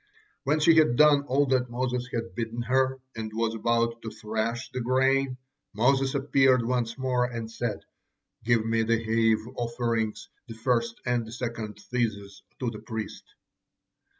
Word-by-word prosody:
When 150 Hz, +3 st, +2 dB
she 160 Hz, +2 st, +5 dB
had 155 Hz, -7 st, +5 dB
done 145 Hz, 0 st, +5 dB
all 140 Hz, +1 st, +2 dB
that 125 Hz, -2 st, +2 dB
Moses 125 Hz, 0 st, -2 dB
had 115 Hz, 0 st, -3 dB
bidden 115 Hz, 0 st, -3 dB
her, 130 Hz, +2 st, +1 dB, 0.2 s
and 110 Hz, -1 st, -5 dB
was 115 Hz, 0 st, 0 dB
about 115 Hz, +1 st, 0 dB
to 110 Hz, -, -5 dB
thrash 110 Hz, +2 st, -3 dB
the 130 Hz, -, -3 dB
grain, 130 Hz, +1 st, +2 dB, 0.4 s
Moses 135 Hz, +4 st, +2 dB
appeared 135 Hz, -3 st, +3 dB
once 120 Hz, -1 st, -1 dB
more, 130 Hz, -2 st, +1 dB
and 115 Hz, -2 st, -5 dB
said: 115 Hz, -2 st, -3 dB, 0.6 s
'Give 115 Hz, -1 st, +2 dB
me 115 Hz, 0 st, +1 dB
the 115 Hz, +1 st, +2 dB
heave 110 Hz, 0 st, +1 dB
offerings, 115 Hz, -2 st, -2 dB, 0.2 s
the 115 Hz, -, -8 dB
first 115 Hz, 0 st, 0 dB
and 120 Hz, -1 st, +1 dB
the -, -, -9 dB
second 115 Hz, -3 st, -5 dB
tithes 105 Hz, -3 st, -3 dB, 0.2 s
to 125 Hz, -3 st, -1 dB
the 110 Hz, -, -8 dB
priest.' 110 Hz, -2 st, -7 dB
120 Hz, 155 wpm, -27 LUFS, 115-130 Hz, 0.6 s, she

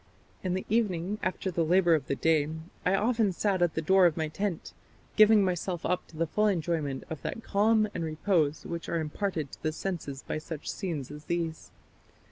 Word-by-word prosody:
In 185 Hz, -1 st, -1 dB
the 190 Hz, -, -3 dB
evening, 205 Hz, -3 st, 0 dB
after 185 Hz, 0 st, -2 dB
the 170 Hz, -1 st, +1 dB
labour 175 Hz, +1 st, +4 dB
of 150 Hz, -4 st, +1 dB
the 140 Hz, -, 0 dB
day, 155 Hz, -1 st, +2 dB, 0.3 s
I 185 Hz, -, +3 dB
often 220 Hz, 0 st, +2 dB
sat 190 Hz, 0 st, 0 dB
at 175 Hz, -2 st, +2 dB
the 160 Hz, -, -1 dB
door 190 Hz, +2 st, +6 dB
of 165 Hz, -, -2 dB
my 160 Hz, -1 st, -1 dB
tent, 190 Hz, +1 st, -3 dB, 0.4 s
giving 215 Hz, -2 st, +7 dB
myself 180 Hz, -1 st, -2 dB
up 180 Hz, -, -1 dB
to 160 Hz, -, -14 dB
the 165 Hz, -, +1 dB
full 210 Hz, +7 st, +1 dB
enjoyment 160 Hz, -7 st, -1 dB
of 160 Hz, -, -5 dB
that 225 Hz, -, -5 dB
calm 215 Hz, +1 st, +3 dB
and 170 Hz, -, -3 dB
repose 160 Hz, -1 st, 0 dB
which 170 Hz, -1 st, -5 dB
are 170 Hz, -, 0 dB
imparted 160 Hz, -1 st, -2 dB
to -, -, -12 dB
the 155 Hz, -, 0 dB
senses 155 Hz, -5 st, -4 dB
by -, -, -3 dB
such 155 Hz, -1 st, -6 dB
scenes 155 Hz, -9 st, -4 dB
as 150 Hz, 0 st, -10 dB
these.... 165 Hz, -2 st, -3 dB
170 Hz, 200 wpm, -29 LUFS, 155-195 Hz, 0.4 s, giving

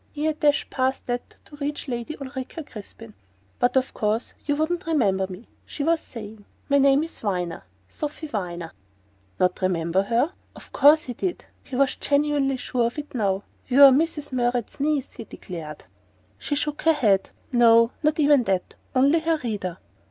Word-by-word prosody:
He 300 Hz, +1 st, -3 dB
had 310 Hz, -1 st, -1 dB
dashed 295 Hz, -3 st, +2 dB
past 260 Hz, 0 st, -1 dB
that 245 Hz, 0 st, -3 dB, 0.2 s
to 290 Hz, -, -14 dB
reach 290 Hz, +1 st, -4 dB
Lady 240 Hz, +4 st, -4 dB
Ulrica 275 Hz, +3 st, -6 dB
Crispin! 225 Hz, -2 st, -10 dB, 0.5 s
"But 245 Hz, +1 st, +2 dB
of 260 Hz, 0 st, 0 dB
course 215 Hz, +2 st, -1 dB
you 290 Hz, -, +2 dB
wouldn't 330 Hz, +4 st, -1 dB
remember 200 Hz, -12 st, +2 dB
me," 190 Hz, +5 st, -9 dB, 0.2 s
she 290 Hz, -, -5 dB
was 330 Hz, +2 st, +2 dB
saying. 215 Hz, -5 st, -10 dB, 0.3 s
"My 280 Hz, 0 st, +4 dB
name 275 Hz, +2 st, +4 dB
is 330 Hz, -, -5 dB
Viner 180 Hz, -5 st, -3 dB, 0.2 s
Sophy 300 Hz, -, -5 dB
Viner." 175 Hz, -, -4 dB, 0.7 s
Not 180 Hz, +1 st, +1 dB
remember 180 Hz, 0 st, +1 dB
her? 235 Hz, -, +1 dB, 0.2 s
But -, -, -11 dB
of -, -, -18 dB
course 305 Hz, +2 st, +6 dB
he 245 Hz, -, -6 dB
DID! 355 Hz, -, -3 dB, 0.2 s
He 260 Hz, -, -7 dB
was 275 Hz, +1 st, +2 dB
genuinely 285 Hz, -2 st, +1 dB
sure 245 Hz, -2 st, 0 dB
of 235 Hz, -, -7 dB
it 295 Hz, 0 st, -6 dB
now. 200 Hz, -5 st, 0 dB, 0.2 s
"You're 275 Hz, +1 st, +8 dB
Mrs. 295 Hz, +1 st, 0 dB
Murrett's 245 Hz, 0 st, -1 dB
niece," 285 Hz, -1 st, 0 dB
he 230 Hz, -, -9 dB
declared. 160 Hz, -8 st, -9 dB, 0.6 s
She 290 Hz, -, -2 dB
shook 295 Hz, +1 st, -2 dB
her 325 Hz, -, +4 dB
head. 200 Hz, -9 st, +2 dB, 0.2 s
"No; 230 Hz, -1 st, +5 dB
not 305 Hz, 0 st, +1 dB
even 290 Hz, -2 st, +5 dB
that. 190 Hz, -3 st, -1 dB, 0.2 s
Only 280 Hz, +5 st, +4 dB
her 325 Hz, 0 st, +1 dB
reader." 200 Hz, -6 st, -3 dB
260 Hz, 175 wpm, -24 LUFS, 210-295 Hz, 0.7 s, You're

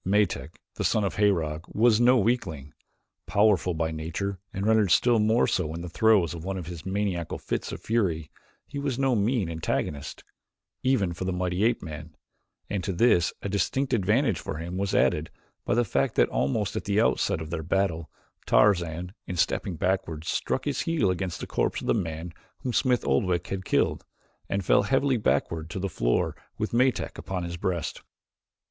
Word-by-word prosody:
Metak, 100 Hz, 0 st, 0 dB, 0.2 s
the -, -, -1 dB
son 110 Hz, -, +2 dB
of 100 Hz, -, -2 dB
Herog, 85 Hz, -7 st, +1 dB
was 115 Hz, +1 st, +3 dB
no 125 Hz, +2 st, +6 dB
weakling. 95 Hz, -, -1 dB, 0.5 s
Powerful 100 Hz, -4 st, +3 dB
by 80 Hz, 0 st, -1 dB
nature 85 Hz, +5 st, -4 dB
and 95 Hz, +1 st, -3 dB
rendered 110 Hz, -3 st, +4 dB
still 120 Hz, +7 st, +4 dB
more 110 Hz, +3 st, +3 dB
so 80 Hz, -4 st, -1 dB
in 85 Hz, -, -5 dB
the 90 Hz, -, -6 dB
throes 100 Hz, -3 st, +3 dB
of 85 Hz, -2 st, -7 dB
one 95 Hz, +1 st, -3 dB
of 90 Hz, -, -5 dB
his 85 Hz, 0 st, -8 dB
maniacal 95 Hz, -4 st, -2 dB
fits -, -, -3 dB
of -, -, -6 dB
fury 85 Hz, -9 st, 0 dB, 0.3 s
he 140 Hz, -, -6 dB
was 140 Hz, -3 st, -2 dB
no 135 Hz, -2 st, +2 dB
mean 110 Hz, -1 st, +1 dB
antagonist, 75 Hz, -3 st, -3 dB, 0.6 s
even 110 Hz, -10 st, +1 dB
for 85 Hz, -, -5 dB
the 95 Hz, -, 0 dB
mighty 90 Hz, +1 st, -1 dB
ape 120 Hz, +1 st, +2 dB
man, 75 Hz, -1 st, -8 dB, 0.5 s
and 100 Hz, -3 st, -2 dB
to 95 Hz, -, -1 dB
this 90 Hz, -3 st, +3 dB
a -, -, -2 dB
distinct 115 Hz, +7 st, 0 dB
advantage 110 Hz, -, +2 dB
for -, -, -5 dB
him 85 Hz, +3 st, -5 dB
was 95 Hz, +1 st, -1 dB
added 75 Hz, +1 st, +2 dB, 0.4 s
by -, -, +1 dB
the 120 Hz, 0 st, +3 dB
fact -, -, 0 dB
that -, -, +4 dB
almost 100 Hz, +9 st, -1 dB
at -, -, -3 dB
the 100 Hz, +1 st, +1 dB
outset 110 Hz, -, +2 dB
of 80 Hz, 0 st, -7 dB
their 85 Hz, -2 st, -2 dB
battle 85 Hz, -2 st, -1 dB, 0.4 s
Tarzan, 85 Hz, +5 st, +2 dB
in 90 Hz, -, -4 dB
stepping 85 Hz, +2 st, 0 dB
backward, 85 Hz, -2 st, -1 dB
struck 130 Hz, -, -1 dB
his 145 Hz, -2 st, -1 dB
heel 160 Hz, -, +1 dB
against 90 Hz, -1 st, -3 dB
the -, -, -3 dB
corpse -, -, -1 dB
of -, -, -7 dB
the -, -, +3 dB
man 85 Hz, -4 st, -3 dB, 0.3 s
whom 125 Hz, -, -3 dB
Smith 125 Hz, 0 st, +2 dB
Oldwick 85 Hz, +6 st, +1 dB
had 95 Hz, -1 st, -4 dB
killed, -, -, +1 dB, 0.5 s
and 100 Hz, -2 st, -1 dB
fell -, -, +5 dB
heavily 135 Hz, +5 st, +2 dB
backward 80 Hz, -6 st, 0 dB
to -, -, -5 dB
the 95 Hz, +1 st, -1 dB
floor -, -, 0 dB, 0.2 s
with -, -, -3 dB
Metak 125 Hz, +2 st, +1 dB
upon 95 Hz, -2 st, -4 dB
his 85 Hz, 0 st, -4 dB
breast. 85 Hz, -3 st, -2 dB
95 Hz, 185 wpm, -27 LUFS, 85-110 Hz, 0.6 s, no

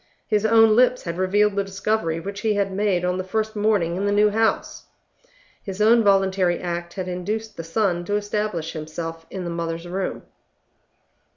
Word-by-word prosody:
His 215 Hz, 0 st, +1 dB
own 225 Hz, -1 st, +6 dB
lips 250 Hz, +1 st, +3 dB
had 170 Hz, 0 st, -5 dB
revealed 205 Hz, +2 st, +2 dB
the 200 Hz, -, +1 dB
discovery 195 Hz, -4 st, -1 dB
which 200 Hz, +3 st, -6 dB
he 220 Hz, -2 st, +1 dB
had 200 Hz, -1 st, 0 dB
made 190 Hz, -3 st, +1 dB
on 180 Hz, +1 st, 0 dB
the -, -, -2 dB
first 220 Hz, +3 st, -2 dB
morning 205 Hz, -5 st, +1 dB
in 200 Hz, +2 st, -1 dB
the -, -, +1 dB
new 210 Hz, +1 st, +4 dB
house; 225 Hz, +1 st, -1 dB, 0.7 s
his 195 Hz, -2 st, -7 dB
own 225 Hz, +2 st, +5 dB
voluntary 190 Hz, -3 st, +2 dB
act 170 Hz, -1 st, -4 dB
had 185 Hz, -2 st, -4 dB
induced 210 Hz, +5 st, -4 dB
the 165 Hz, -, -6 dB
son 175 Hz, +1 st, 0 dB
to 205 Hz, -, -1 dB
establish 205 Hz, -5 st, -2 dB
himself 165 Hz, +1 st, -6 dB
in 190 Hz, -, -5 dB
the 170 Hz, -, -4 dB
mother's 165 Hz, 0 st, -4 dB
room. 190 Hz, +2 st, -3 dB
195 Hz, 180 wpm, -23 LUFS, 175-210 Hz, 0.7 s, own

